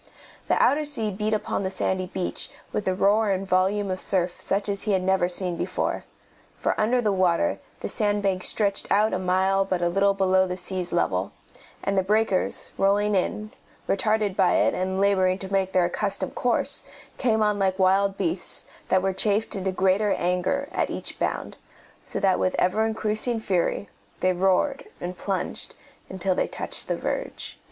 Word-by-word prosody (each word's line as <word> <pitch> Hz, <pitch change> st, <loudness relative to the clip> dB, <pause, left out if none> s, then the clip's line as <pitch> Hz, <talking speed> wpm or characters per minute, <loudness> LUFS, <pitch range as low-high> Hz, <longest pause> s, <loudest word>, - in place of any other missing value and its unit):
The -, -, +2 dB
outer 300 Hz, +2 st, +4 dB
sea 240 Hz, -8 st, -1 dB
beat 210 Hz, +2 st, -2 dB
upon 210 Hz, -2 st, -1 dB
the 190 Hz, -, -1 dB
sandy 185 Hz, -1 st, -1 dB
beach 180 Hz, 0 st, -3 dB, 0.2 s
with 210 Hz, -, -3 dB
a 185 Hz, -, +1 dB
roar 205 Hz, +3 st, +3 dB
and 195 Hz, 0 st, 0 dB
volume 190 Hz, +2 st, +1 dB
of 185 Hz, -, -2 dB
surf 180 Hz, -2 st, 0 dB
such 200 Hz, +1 st, -1 dB
as 200 Hz, -1 st, -1 dB
he 210 Hz, -, 0 dB
had 185 Hz, -1 st, +1 dB
never 190 Hz, -1 st, +2 dB
seen 180 Hz, -1 st, -1 dB
before, -, -, -2 dB, 0.5 s
for -, -, 0 dB
under 240 Hz, +3 st, +2 dB
the 215 Hz, -3 st, +1 dB
water 185 Hz, -, +2 dB, 0.2 s
the -, -, -2 dB
sand 205 Hz, -2 st, 0 dB
bank 190 Hz, -2 st, +1 dB
stretched 200 Hz, 0 st, 0 dB
out 210 Hz, +2 st, +3 dB
a 185 Hz, -, 0 dB
mile 190 Hz, +1 st, +2 dB
but 190 Hz, -2 st, -1 dB
a 175 Hz, -, +1 dB
little 195 Hz, +2 st, +2 dB
below 190 Hz, -1 st, +3 dB
the 180 Hz, 0 st, -4 dB
sea's 185 Hz, -1 st, -3 dB
level, 95 Hz, -, 0 dB, 0.5 s
and 200 Hz, -, 0 dB
the 190 Hz, -, +4 dB
breakers, 205 Hz, 0 st, 0 dB
rolling 205 Hz, +2 st, +3 dB
in, 210 Hz, +3 st, -1 dB, 0.4 s
retarded 210 Hz, -1 st, +1 dB
by 190 Hz, -2 st, +3 dB
it -, -, +3 dB
and 190 Hz, +1 st, -1 dB
labouring 190 Hz, -2 st, +3 dB
to 195 Hz, 0 st, -7 dB
make 190 Hz, -1 st, +1 dB
their 180 Hz, -2 st, +3 dB
accustomed 190 Hz, +1 st, -1 dB
course, 245 Hz, -1 st, 0 dB, 0.4 s
came 220 Hz, -4 st, +2 dB
on 210 Hz, -1 st, +1 dB
like 190 Hz, -1 st, +1 dB
wild 195 Hz, +1 st, +3 dB
beasts 330 Hz, -, -2 dB, 0.2 s
that 185 Hz, 0 st, +3 dB
were 195 Hz, 0 st, +1 dB
chafed 210 Hz, +3 st, 0 dB
into 190 Hz, -1 st, -1 dB
greater 190 Hz, +2 st, +2 dB
anger 180 Hz, +11 st, 0 dB
at -, -, 0 dB
each -, -, -4 dB
bound, -, -, -2 dB, 0.5 s
so -, -, -5 dB
that 190 Hz, -2 st, +2 dB
with 185 Hz, -, +1 dB
ever 215 Hz, +5 st, +2 dB
increasing 220 Hz, +2 st, -1 dB
fury 195 Hz, -1 st, 0 dB, 0.3 s
they 185 Hz, 0 st, +3 dB
roared 190 Hz, +10 st, +1 dB
and 180 Hz, +1 st, -5 dB
plunged 195 Hz, 0 st, -3 dB, 0.3 s
until 190 Hz, 0 st, -1 dB
they -, -, 0 dB
touched -, -, -2 dB
the -, -, -1 dB
verge. -, -, -4 dB
195 Hz, 180 wpm, -25 LUFS, 185-210 Hz, 0.5 s, outer